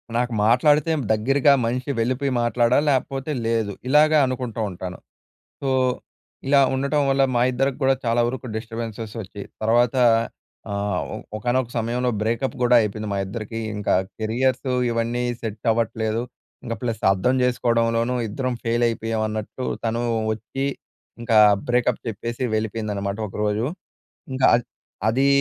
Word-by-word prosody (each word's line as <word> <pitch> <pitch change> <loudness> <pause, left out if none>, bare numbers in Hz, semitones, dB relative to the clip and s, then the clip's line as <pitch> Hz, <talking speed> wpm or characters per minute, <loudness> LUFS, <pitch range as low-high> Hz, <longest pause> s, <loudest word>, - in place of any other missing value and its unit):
నాకు 120 0 0
మాట్లాడితే 145 +7 +4 0.2
దగ్గరగా 135 +6 +3
మనిషి 125 +4 -2
వెళ్ళిపోయి 130 +4 0
మాట్లాడాలి. 120 +4 +2
లేపోతే 135 +2 -1
లేదు. 115 -3 0 0.2
ఇలాగ 150 +3 +5
అనుకుంటో 125 -3 -3
ఉంటాను. 90 0 -7 0.6
సో, 135 - -1 0.8
ఇలా 140 0 +5
ఉండటం 140 +3 +1
వల్ల, 135 0 +3
మా 120 - +3
ఇద్దరికి 135 +1 0
కూడా 135 0 +4
చాలా 115 +1 +2
వరకు 130 +1 -5
డిస్టర్బెన్సెస్ 115 -1 -6
వచ్చి, 100 +2 -9 0.2
తర్వాత 120 +3 +3 0.8
ఆహ్, 100 -2 -1
ఒ - - -4 0.2
ఒకానొక 120 +2 0
సమయంలో, 120 +2 0
బ్రేకప్ 115 +4 -1
కూడా 125 0 +5
అయిపోయింది 110 0 -3
మా - - -1
ఇద్దరికీ. 110 +3 -5 0.2
ఇంక 105 -1 -4 0.3
కెరియర్స్ 125 +4 0 0.2
ఇవన్నీ 115 +1 -1 0.2
సెట్ 110 0 -5
అవ్వట్లేదు. 110 0 -1 0.4
ఇంకా 115 -3 -3
ప్లస్ 115 -2 -3
అర్థం 125 +7 +1
చేసుకోవడంలోనూ, 115 -1 +1
ఇద్దరం 130 +4 -2
ఫెయిల్ 120 +1 +1
అయిపోయాం 115 -1 -2
అన్నట్టు, 110 +4 -5 0.2
తను 115 +1 -1 0.3
వచ్చి, 135 +5 -4 0.6
ఇంకా 115 -2 +2 0.3
బ్రేకప్ 125 -1 +1
చెప్పేసి 115 +3 -4
వెళిపెయిందనమాట 105 -2 -2
ఒకరోజు. 105 +3 -1 0.7
ఇంకా 130 0 +2
అద్ 120 0 -1 0.4
అదీ 135 +4 +2
115 Hz, 130 wpm, -23 LUFS, 110-130 Hz, 0.8 s, ఇలాగ